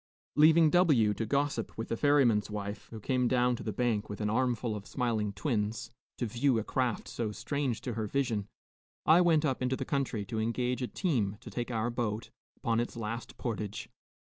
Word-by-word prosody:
Leaving 155 +1 +6
W 145 - +4
to 110 +2 -3
gossip 140 -3 -1
with 115 - -4
the - - 0
ferryman's 125 -6 +3
wife, 105 0 -5
who 110 - -8
came 125 +3 +1
down 125 0 +3
to - - -8
the 110 - -3
bank 110 -1 0
with 105 - -6
an 105 -1 0
armful 120 -2 0
of 100 -1 -7
smiling 115 -5 -1
twins, 110 +1 -2 0.3
to 120 - -1
view 125 +3 +1
a 110 - 0
craft 125 -1 -1
so 115 -3 -3
strange 135 +1 -2
to 125 - -4
her 110 -1 -2
vision, 115 -5 -1 0.6
I 165 +3 +7
went 165 -3 +4
up 135 -3 0
into 130 +1 +1
the 135 - -4
country 130 -7 -1
to 110 +2 -3
engage 125 +3 -1
a 125 - -1
team 115 - -1
to - - -10
take 120 0 -3
our 115 0 -1
boat 115 -2 -3 0.3
upon 115 -1 0
its 120 0 -3
last 115 +1 -5
portage. 105 -4 -4
120 Hz, 195 wpm, -31 LUFS, 110-130 Hz, 0.6 s, I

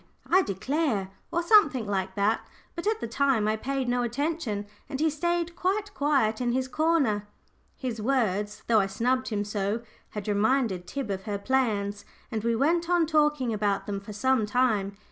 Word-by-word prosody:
I 370 +2 +5
declare!" 220 - -1 0.2
or 340 - 0
something 330 - +5
like 190 -2 -2
that, 205 +3 +2 0.3
but 340 +3 -4
at 440 0 +1
the - - -2
time 240 -3 +2
I 215 - +2
paid 265 +3 -2
no 245 0 +1
attention, 240 -4 -2 0.2
and 275 -2 -4
he 315 0 +2
stayed 345 +2 -1
quite 405 +3 -1
quiet 265 -7 +1
in 240 -1 +1
his 260 +1 0
corner. 275 -9 +1 0.5
His 240 -4 -4
words, 210 -5 0
though 225 -2 +4
I 195 - +2
snubbed 255 +6 0
him 205 -2 -1
so, 205 +2 -2 0.3
had 210 -1 -6
reminded 210 -3 +1
Tib 270 -4 -4
of 190 0 -4
her 205 -1 -2
plans, 205 -3 0 0.3
and 220 -1 -2
we 230 0 +1
went 335 +7 +1
on 350 -2 +4
talking 300 -6 +2
about 205 -2 0
them 200 -1 -3
for 200 +2 -10
some 225 +1 +1
time. 210 -4 +1
240 Hz, 180 wpm, -27 LUFS, 205-290 Hz, 0.5 s, I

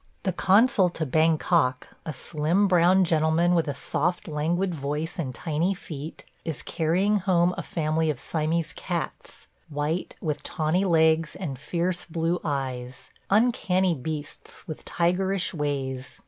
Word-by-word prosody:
The 185 - 0
consul 195 +1 +4
to 165 -2 -3
Bangkok 155 -2 +2
– - - -38
a - - -1
slim, 160 +7 +1
brown 180 +1 +5
gentleman 165 +1 +2
with 165 -3 +2
a 145 - -2
soft, 175 +5 -1
languid 170 +5 0
voice 150 +3 -3
and 140 -6 -2
tiny 165 +8 -1
feet 155 -3 -8
– - - -38
is 155 -7 -4
carrying 185 +6 +1
home 180 -2 +2
a - - -3
family 160 -1 0
of 145 -5 -2
Siamese 160 +1 -1
cats; - - -5 0.2
white, 150 +4 -2
with 150 -3 -2
tawny 170 +3 0
legs 160 -2 +3
and 140 -9 -5
fierce 175 +4 -2
blue 165 +1 -1
eyes; 130 -4 -4 0.2
uncanny 195 -4 +3
beasts 150 +1 -6
with 155 - -7
tigerish 185 +2 0
ways. 135 -4 -3
165 Hz, 145 wpm, -26 LUFS, 150-180 Hz, 0.2 s, brown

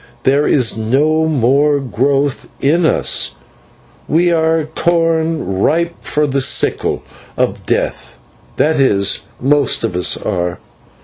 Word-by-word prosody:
There 140 +3 +2
is 125 -7 +2
no 145 +8 +1
more 145 +1 +2
growth 135 +2 -1
in 160 +4 +2
us, - - +1 0.7
we 175 +2 +2
are 160 -1 +1
corn 165 - 0
ripe 170 - +1
for 150 0 -1
the 140 -1 -1
sickle 130 - +1 0.3
of - - -2
Death - - -3 0.4
that 155 -1 +1
is, 100 -7 +2 0.2
most 140 -1 +1
of 110 -6 -2
us 90 -1 +2
are. 90 0 -3
145 Hz, 120 wpm, -15 LUFS, 125-160 Hz, 0.7 s, There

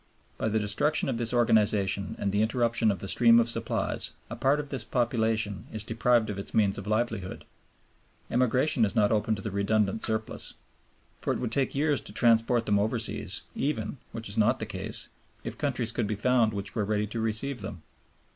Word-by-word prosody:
By 110 - 0
the 110 - 0
destruction 110 +10 +1
of 125 - -1
this 120 -1 -1
organization 105 -5 +2
and 100 - -1
the 105 +1 +1
interruption 115 0 +2
of 100 - 0
the 95 - -4
stream 115 +3 +5
of 115 - +2
supplies, 115 -1 -1 0.2
a - - -3
part 140 +3 +2
of 145 -1 -5
this 135 -5 -3
population 110 -4 -1
is 110 -1 -3
deprived 115 0 +1
of 100 - -5
its 100 - -6
means 100 -2 +2
of 100 - -9
livelihood. 110 -4 -2 0.9
Emigration 125 +1 +2
is 100 - 0
not 105 -1 +3
open 110 0 +1
to 100 - -8
the 110 - -4
redundant 100 +1 0
surplus. 110 -1 -2 0.7
For - - 0
it - - -3
would 120 -3 -3
take 135 +2 0
years 145 0 +1
to - - -8
transport 115 +1 +3
them 100 -1 +2
overseas, 110 +2 0
even, 130 -4 -2
which 115 0 -7
is 100 +3 -2
not 105 - +3
the - - -4
case, - - 0 0.3
if - - -5
countries - - -1
could - - -2
be 105 - -2
found 120 +1 +2
which 100 -1 -5
were 105 - -1
ready 105 +1 0
to 110 +3 -5
receive 115 +3 -1
them. 95 -5 -7
110 Hz, 195 wpm, -28 LUFS, 105-120 Hz, 0.9 s, stream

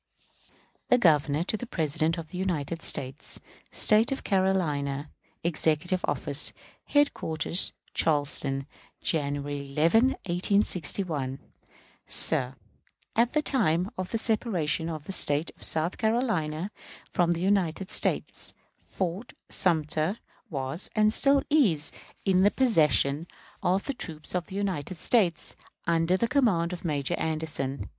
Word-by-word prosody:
_ - - -29 0.4
The 250 - +4
Governor 150 - +3
to 215 - -2
the 245 - -7
President 160 -1 0
of 160 -2 -7
the 180 - -7
United 170 -3 -2
States. 135 0 -1 0.3
State 220 +3 +3
of 270 - 0
South - - -11
Carolina, 150 -8 0 0.3
Executive 170 +2 0
Office, - - 0 0.3
Headquarters, 185 - +1 0.2
Charleston, 145 -3 +2 0.4
January 145 -2 -2
11, 225 - +3
1861. 175 -6 0 0.7
Sir: - - +4 0.6
At 235 +1 +2
the 300 0 +1
time 190 - +1
of 185 -1 -4
the 230 - -1
separation 195 -8 0
of 155 -3 -5
the 175 - -7
State 150 -3 +3
of - - -24
South 160 +3 +1
Carolina 210 -7 -1 0.4
from 175 -1 +2
the 170 - -4
United 190 -2 0
States, - - +1 0.3
Fort 190 +5 -4 0.2
Sumter 160 +2 +1 0.3
was, 135 +3 -1
and 215 0 +3
still 275 +2 +4
is, 200 - +2 0.3
in 185 -1 +3
the 200 - +6
possession 155 - +2 0.3
of 190 +2 +1 0.2
troops 155 -3 -5
of 180 -2 -2
the 190 - -9
United 190 -4 -3
States, 185 -4 +1 0.3
under 170 +2 +2
the 235 - 0
command 210 -10 +1
of 175 - -7
Major 150 -1 -1
Anderson. 145 -8 -3
170 Hz, 125 wpm, -27 LUFS, 150-200 Hz, 0.7 s, the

